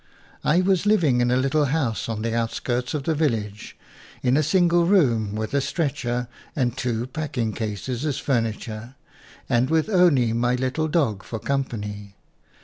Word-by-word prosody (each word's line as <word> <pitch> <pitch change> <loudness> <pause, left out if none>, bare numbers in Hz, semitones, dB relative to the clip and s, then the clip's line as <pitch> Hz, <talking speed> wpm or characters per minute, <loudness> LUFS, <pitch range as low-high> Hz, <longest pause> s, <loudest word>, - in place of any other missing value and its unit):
I 170 +4 +3
was 190 +1 +2
living 155 -13 +3
in 120 - +2
a 125 - +3
little 135 +3 +2
house 130 -7 -1
on 110 -1 -3
the 115 0 -1
outskirts 120 +3 -1
of 145 - -2
the 160 - +1
village, 110 -9 -2 0.5
in 125 0 +3
a 150 - +4
single 175 +1 +3
room, 120 - +3
with 110 +2 -3
a 140 - +2
stretcher 130 -6 -2 0.3
and 125 -4 0
two 120 -3 -2
packing 130 -5 -3
cases 115 +4 -4
as 145 -3 -1
fur 140 -6 +1
niture, 110 +2 -6 0.5
and 120 +2 +2
with 160 +4 +1
only 160 - +4
my 120 +2 +1
little 130 +5 -1
dog 140 - +1
for 115 - -6
company. 105 -7 -3
125 Hz, 165 wpm, -24 LUFS, 115-155 Hz, 0.5 s, a